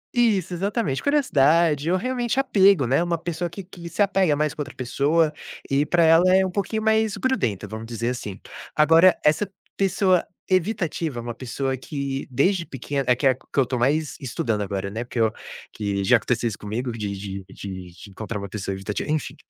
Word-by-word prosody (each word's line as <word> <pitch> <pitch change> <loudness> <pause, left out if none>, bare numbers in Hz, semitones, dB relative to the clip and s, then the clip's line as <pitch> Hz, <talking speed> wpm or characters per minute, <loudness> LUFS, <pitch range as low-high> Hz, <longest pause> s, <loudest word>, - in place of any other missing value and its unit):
Isso, 205 -7 +2
exatamente, 195 - -1
curiosidade, 165 - +3
ou 185 - +3
realmente 250 +4 -1
apego 200 - +4
né, 135 +8 +2
uma 170 -1 0
pessoa 175 +1 -3
que 190 +4 -8
que 175 -2 -10
se - - -13
apega 190 -6 +2
mais 150 0 0
com 150 - -6
outra 145 -1 -6
pessoa, 150 +5 +1 0.3
e 140 +1 +1
para 170 0 +3
ela 165 +2 +6
é 190 0 +5
um 185 - -3
pouquinho 210 +3 -2
mais 220 -1 +2
grudenta, 125 - -1
vamos 110 +1 -7
dizer 115 0 -2
assim. 105 -6 -5 0.4
Agora 165 +4 +6
essa 155 +7 +3 0.3
pessoa 190 -2 +2 0.2
evitativa, 175 - -1
uma 120 0 -5
pessoa 130 +2 -3
que 140 0 -4
desde 170 +8 +2
pequena 140 -1 -4
é 125 - +5
que 140 - -3
é 135 - +7
a - - 0
que 130 - -18 0.2
eu 135 - +6
estou 125 -1 -3
mais 145 +5 +1
estudando 115 -4 -2
agora, 100 -1 -3
né. 110 +3 -3
Porque 120 0 -5
eu, 110 -1 +3 0.4
que 100 -2 -2
já 120 +5 +5
aconteceu 120 +1 -1
isso 105 -3 -4
comigo 115 +5 -3
de 105 -3 -4
de 95 -1 -6
de 95 -2 -7
de 100 - -12
encontrar 105 +2 -5
uma 100 0 -6
pessoa 100 -1 -4
evitativa, 100 +7 -4
enfim. 155 -2 -1
145 Hz, 195 wpm, -23 LUFS, 115-185 Hz, 0.4 s, é